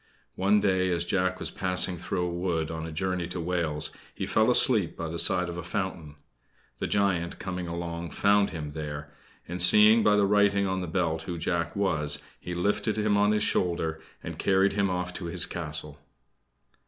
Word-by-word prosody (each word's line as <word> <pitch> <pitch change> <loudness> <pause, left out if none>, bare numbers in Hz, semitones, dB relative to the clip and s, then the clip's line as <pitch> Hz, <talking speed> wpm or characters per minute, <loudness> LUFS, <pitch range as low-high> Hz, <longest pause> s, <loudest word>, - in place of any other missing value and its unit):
One 100 +2 +3
day, 95 -2 +1
as 85 -1 0
Jack 95 0 0
was - - -4
passing 90 0 +1
through 90 +1 -3
a 85 - -3
wood 85 -3 -2
on 80 0 -5
a - - -7
journey 90 +1 -2
to 90 - -5
Wales, 85 -3 0 0.2
he - - -3
fell 110 +2 +2
asleep 115 -7 +3
by 85 -1 -4
the 85 +1 -4
side 90 -1 +1
of 85 0 -5
a - - -6
fountain. 90 -5 -4 0.6
The - - -2
Giant, 90 -4 0
coming 90 -1 -5
along, 85 0 -5
found 100 0 +3
him 75 -4 -6
there; 75 -1 -6 0.4
and, 90 +1 -4
seeing 105 +5 +7
by 105 -1 +4
the 100 -1 +3
writing 100 0 +3
on 95 -1 -1
the 90 - -4
belt 80 -2 -1
who 85 - -3
Jack 85 0 -2
was, 75 -7 0 0.2
he 90 - -6
lifted 105 +4 0
him 105 -1 +1
on 105 +1 +3
his 105 0 +1
shoulder 80 -3 0 0.2
and - - -7
carried 95 +1 +3
him 100 -1 +1
off 90 0 -3
to 90 - -6
his 85 +2 +1
castle. 75 -3 -4
90 Hz, 190 wpm, -27 LUFS, 85-100 Hz, 0.6 s, seeing